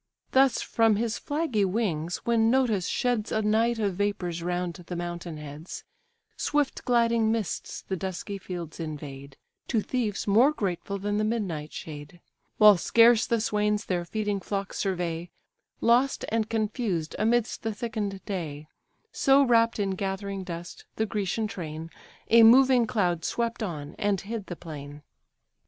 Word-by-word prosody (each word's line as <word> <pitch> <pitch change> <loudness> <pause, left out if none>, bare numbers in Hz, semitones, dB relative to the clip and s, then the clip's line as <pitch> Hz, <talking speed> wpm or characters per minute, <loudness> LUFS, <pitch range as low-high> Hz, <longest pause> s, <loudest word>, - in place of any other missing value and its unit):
Thus 265 -1 +4
from 225 -2 +3
his 225 +1 -1
flaggy 290 -8 0
wings 180 -5 -1
when 225 -1 +3
Notus 230 -7 +2
sheds 240 -4 0
A 220 - 0
night 225 +3 +2
of 200 -4 -1
vapours 180 -4 -1
round 175 0 -2
the 175 +1 -8
mountain 175 -1 -5
heads, 150 +3 -8 0.5
Swift 295 -2 0
gliding 230 -2 +3
mists 225 -4 -3
the 190 - -3
dusky 190 +2 -5
fields 175 -4 -7
invade, 140 -4 -7 0.3
To 230 - +1
thieves 215 -2 -2
more 230 +8 +5
grateful 200 - -3
than 205 +1 -2
the - - +1
midnight 190 -9 -2
shade; 150 +2 -9 0.4
While 210 -2 +8
scarce 230 +5 +5
the 235 - +1
swains 210 -1 0
their 175 -2 -1
feeding 205 +2 -2
flocks 195 +1 -4
survey, 175 -3 -2 0.5
Lost 245 +4 +3
and 220 -1 0
confused 215 -7 -1
amidst 230 +1 +1
the 225 - -2
thicken'd 210 -3 -4
day: 155 -6 -5 0.4
So 275 +1 +4
wrapp'd 230 -3 +3
in 200 -1 0
gathering 195 0 -3
dust, 175 -1 -8
the 220 - 0
Grecian 210 +1 -1
train, 165 -5 -6 0.4
A 230 0 +8
moving 250 +1 +7
cloud, 180 -9 0
swept 235 +4 -2
on, 150 -8 -4
and 205 -2 +1
hid 210 +1 -6
the 175 - -5
plain. 145 -3 -9
205 Hz, 145 wpm, -27 LUFS, 175-230 Hz, 0.5 s, While